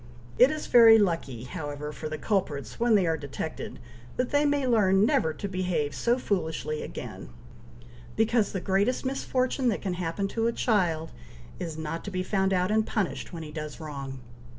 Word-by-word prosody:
It 250 - +8
is 310 0 -3
very 230 -2 +8
lucky, 165 - 0
however, 145 0 -5
for 155 0 -6
the 155 - -4
culprits, 155 -5 -2
when 235 -1 +4
they 195 -3 +4
are 165 -1 +1
detected, 145 -2 -6 0.4
that 250 0 -1
they 290 +1 +3
may 285 -2 +2
learn 205 -5 +4
never 160 -7 +2
to 200 - -4
behave 180 -6 -1
so 240 +1 +1
foolishly 160 -9 -2
again, - - -7 0.9
because 220 -1 +2
the 190 - -3
greatest 200 +9 +1
misfortune 260 -1 0
that 210 - -2
can 190 -3 -1
happen 175 +2 -2
to 225 +2 0
a 235 - 0
child 170 -10 +1 0.5
is, 165 -3 -5
not 160 +1 -4
to - - -4
be 185 -2 -2
found 190 0 +1
out 185 +1 +1
and 220 0 +2
punished 210 -6 -2
when 165 -2 -6
he 150 - -8
does 155 -1 -6
wrong. 140 -4 -6
190 Hz, 180 wpm, -27 LUFS, 160-225 Hz, 0.9 s, It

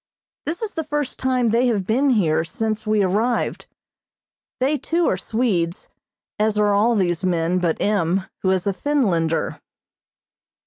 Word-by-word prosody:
This 340 +8 -2
is 430 - -2
the 320 - -3
first 295 -3 -3
time 255 -2 +1
they 235 +3 +3
have 210 -6 0
been 260 +7 +2
here 165 -10 +2
since 215 +5 -3
we 215 -1 +3
arrived. 215 +6 0 0.9
They, 275 +3 +1
too, 335 +6 0
are - - +2
Swedes, 190 -4 -1 0.5
as 215 0 +1
are 210 -1 +3
all 220 +4 +3
these 175 -3 0
men 175 0 +1
but 170 -3 0
M., 190 -2 +1 0.2
who 190 - +1
is 185 -1 +1
a 200 - +1
Finlander. 185 - 0
210 Hz, 150 wpm, -22 LUFS, 180-250 Hz, 0.9 s, they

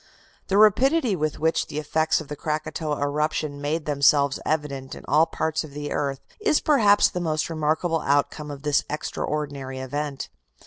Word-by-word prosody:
The 195 - +1
rapidity 245 - +4
with 155 -2 -2
which 160 +1 +1
the 145 - -7
effects 155 +1 +1
of 155 - -8
the 150 - -5
Krakatoa 155 0 -3
eruption 150 0 -1
made 150 +2 -2
themselves 140 -1 +3
evident 140 -4 -2
in - - -11
all 155 +3 +4
parts 160 0 -1
of 150 -3 -11
the 145 0 -5
earth 140 -2 -2 0.2
is 420 -8 +2
perhaps 210 -9 +4
the 180 - -4
most 155 -1 -1
remarkable 160 +1 0
outcome 145 +2 0
of 140 -1 -8
this 145 -1 +2
extraordinary 145 -3 -4
event. 140 +2 -4
150 Hz, 165 wpm, -24 LUFS, 145-160 Hz, 0.2 s, rapidity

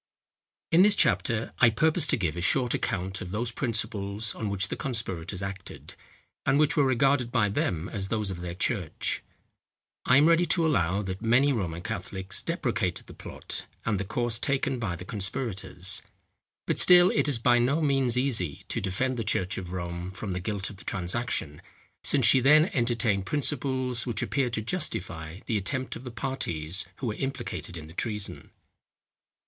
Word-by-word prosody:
In 165 - +6
this 205 +1 +6
chapter 115 - +1
I 120 - +7
purpose 155 +8 +2
to - - +2
give 90 -7 -1
a 85 - -4
short 125 +6 +3
account 95 +1 -2
of 90 - -6
those 115 +5 -2
principles, 110 -3 -1
on 110 - -4
which 100 -1 -1
the - - -2
conspirators 95 -7 -3
acted, 95 0 -7 0.5
and 140 - +3
which 150 -1 +3
were 145 - +4
regarded 130 -1 +2
by 105 -4 +2
them 90 -4 -1
as 100 -2 -4
those 105 -2 -1
of 90 - -6
their 85 -1 -5
church. 95 -3 -1 0.8
I 125 - +5
am 145 - +6
ready 170 +1 +4
to 165 0 +3
allow, 100 - +1
that 95 0 -5
many 125 +5 +4
Roman 85 -7 -3
Catholics 95 0 -3
deprecated - - -2
the - - -12
plot - - -8 0.2
and 105 -4 0
the - - -1
course 115 +3 +1
taken 135 -2 0
by 100 -7 -2
the 90 +2 -9
conspirators; 95 -3 -2 0.6
but - - 0
still 180 0 +8
it 145 -1 +2
is 140 -5 +2
by 120 +1 +4
no 135 +6 +2
means 135 -5 +2
easy 110 - +1
to - - -2
defend 125 +7 -1
the 115 - -1
church 95 -3 0
of 90 -2 -8
Rome 85 0 -4
from 95 +1 -6
the 90 - -2
guilt 100 +2 -3
of 100 - -13
the 90 - -14
transaction, 90 -5 -2 0.4
since 135 -5 +2
she 130 - +7
then 150 +6 +5
entertained 115 -6 +1
principles, 130 -4 0
which 115 -3 -1
appeared 130 -4 -1
to 110 - -1
justify 90 - -4
the 110 - 0
attempt 130 +7 -3
of 125 - -9
the - - -5
parties 95 - -3
who 130 - -6
were 110 - -1
implicated 130 -8 -5
in 80 - -8
the 80 - -13
treason. 105 +2 -4
110 Hz, 180 wpm, -27 LUFS, 95-130 Hz, 0.8 s, still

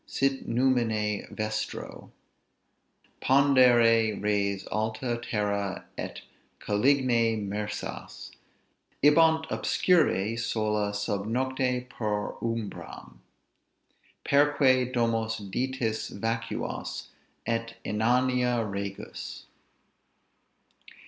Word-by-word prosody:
sit 135 0 -1
numine 115 -4 +1
vestro 110 0 -4 1.1
Pandere 120 -5 +5
res 100 -1 0
alta 110 +3 -1
terra 100 -4 -2
et - - -6 0.4
caligine 115 -2 +2
mersas! 105 +1 -5 0.7
Ibant 160 +2 +5
obscuri, 115 - +2
sola 105 -2 0
sub 105 0 -2
nocte, 125 +1 -1
per 105 -4 -2
umbram, 105 - -5 1.1
Perque 140 -3 +3
domos 115 -2 0
Ditis 110 +2 -2
vacuas, 115 +2 -4 0.4
et 115 0 -2
inania 125 +2 +1
regus. 100 0 -6
115 Hz, 70 wpm, -28 LUFS, 105-125 Hz, 1.1 s, Pandere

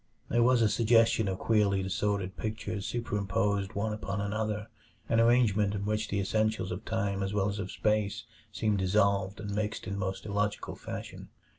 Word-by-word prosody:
There 120 - +3
was 120 0 +4
a - - +5
suggestion 115 0 +3
of 95 -1 -1
queerly 100 -3 +2
disordered 95 0 -1
pictures 110 -2 -4
superimposed 100 -3 -1
one 105 +2 -1
upon 100 -2 -3
another; 105 +1 -2 0.4
an 115 - +2
arrangement 110 -4 +3
in 100 0 -3
which 105 +1 -1
the 100 - -1
essentials 110 0 0
of 95 +4 -4
time 100 -3 -1
as 95 +1 -2
well 100 0 +2
as 100 0 -4
of 95 - -4
space 105 -2 0 0.3
seemed 105 -2 0
dissolved 100 0 +2
and 105 -1 -5
mixed 105 +1 -2
in 95 - -4
the 100 - -3
most 95 0 -3
illogical 105 0 -2
fashion. - - -7
105 Hz, 175 wpm, -30 LUFS, 100-110 Hz, 0.4 s, a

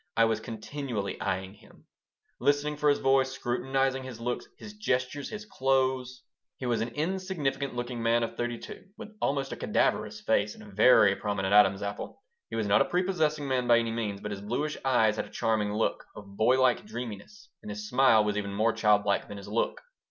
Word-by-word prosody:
I 115 - +6
was 110 -1 0
continually 115 -1 -5
eying 95 +1 -2
him, 105 - -20 0.5
listening 145 +1 +1
for 150 0 +2
his 145 - +3
voice, 135 -1 +2
scrutinizing 135 +2 -1
his 130 -3 -8
look, 120 +1 -2 0.2
his 210 - -10
gestures, 140 -9 -2
his 210 -1 -7
clothes 130 -5 0 0.3
He 130 - -6
was 120 -3 0
an 115 - -1
insignificant 155 -6 -2
looking 120 -1 -4
man 115 +1 +2
of 115 - -4
thirty 120 0 -2
two, - - -10
with 220 -1 -10
almost 135 -1 0
a - - -3
cadaverous - - 0
face 105 +1 +1
and - - -13
a 105 -1 -13
very 105 -1 +6
prominent 100 -2 -2
Adam's 100 -1 +5
apple. 100 - -6 0.3
He - - -5
was 110 -1 0
not 100 0 +4
a - - +4
prepossessing 160 -5 0
man 130 -2 0
by 120 - +6
any 115 -1 0
means, 105 -4 -3
but 105 - -5
his 100 -1 -5
bluish 130 +9 -2
eyes 110 -5 +3
had - - -2
a - - -14
charming 110 -2 0
look, 110 +2 -1
of 100 -1 -11
boy 125 +5 +3
like 130 -2 +3
dreaminess, 125 - -8
and 215 - -9
his 215 -1 -5
smile 130 - +5
was 105 0 -1
even 100 -1 -3
more 110 +2 +2
child 105 -2 +3
like 100 - +1
than 100 - -8
his 100 - -10
look. 110 +3 -1
120 Hz, 205 wpm, -28 LUFS, 105-135 Hz, 0.5 s, I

